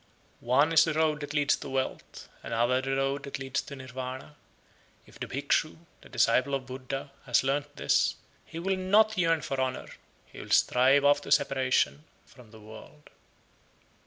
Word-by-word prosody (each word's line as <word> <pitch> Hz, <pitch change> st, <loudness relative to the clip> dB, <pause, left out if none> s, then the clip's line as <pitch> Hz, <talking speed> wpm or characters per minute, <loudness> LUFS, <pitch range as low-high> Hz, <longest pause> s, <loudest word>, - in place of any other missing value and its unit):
75. -, -, -19 dB
"One 140 Hz, +6 st, +3 dB
is 160 Hz, -, +7 dB
the 165 Hz, -2 st, -1 dB
road 155 Hz, -1 st, +1 dB
that 145 Hz, 0 st, -6 dB
leads 145 Hz, -1 st, +3 dB
to -, -, -8 dB
wealth, 130 Hz, 0 st, -4 dB
another 120 Hz, +3 st, 0 dB
the 135 Hz, 0 st, -2 dB
road 135 Hz, +1 st, -1 dB
that 140 Hz, 0 st, -6 dB
leads 135 Hz, +1 st, -3 dB
to 140 Hz, -, -10 dB
Nirvana;" 130 Hz, +2 st, -8 dB, 0.7 s
if -, -, -18 dB
the -, -, -5 dB
Bhikshu, -, -, -1 dB, 0.2 s
the -, -, -16 dB
disciple 140 Hz, +2 st, +2 dB
of 135 Hz, -1 st, -5 dB
Buddha, 135 Hz, +2 st, -6 dB, 0.2 s
has 125 Hz, 0 st, +3 dB
learnt 145 Hz, +2 st, -2 dB
this, -, -, +1 dB, 0.3 s
he 165 Hz, -, -11 dB
will 190 Hz, +3 st, -1 dB
not 210 Hz, +4 st, +3 dB
yearn 165 Hz, -4 st, +1 dB
for 135 Hz, -1 st, -2 dB
honour, 130 Hz, -1 st, -3 dB, 0.4 s
he -, -, -14 dB
will -, -, -10 dB
strive 135 Hz, +3 st, +4 dB
after 145 Hz, 0 st, +3 dB
separation 130 Hz, -, +1 dB, 0.2 s
from 120 Hz, -3 st, -18 dB
the 110 Hz, 0 st, -15 dB
world. 110 Hz, +7 st, -14 dB
135 Hz, 170 wpm, -28 LUFS, 130-150 Hz, 0.7 s, is